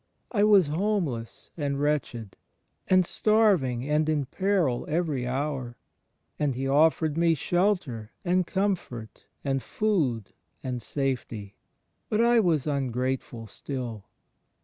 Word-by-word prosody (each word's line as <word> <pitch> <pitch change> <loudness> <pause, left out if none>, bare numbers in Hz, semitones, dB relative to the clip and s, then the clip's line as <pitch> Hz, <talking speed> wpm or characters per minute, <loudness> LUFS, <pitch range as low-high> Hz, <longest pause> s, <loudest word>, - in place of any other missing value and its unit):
I 205 -4 +2
was 205 -4 +6
homeless, 155 - -2
and 140 -3 -2
wretched, 130 -8 -1 0.5
and 185 -1 +4
starving 180 - +2
and 150 +1 +2
in 150 -3 +1
peril 180 -5 0
every 150 -6 -1
hour; 130 -2 -3 0.6
and 145 -4 +1
He 135 +2 -2
offered 155 +2 +3
me 170 -1 +4
shelter 175 - 0
and 180 0 +2
comfort 175 - -3 0.2
and 135 -1 0
food 145 - 0 0.3
and 125 -2 -3
safety; 120 -6 -3 0.6
but 215 - +1
I 235 0 +5
was 165 - +2
ungrateful 130 -4 -2
still. 115 -2 -6
145 Hz, 115 wpm, -27 LUFS, 125-180 Hz, 0.6 s, was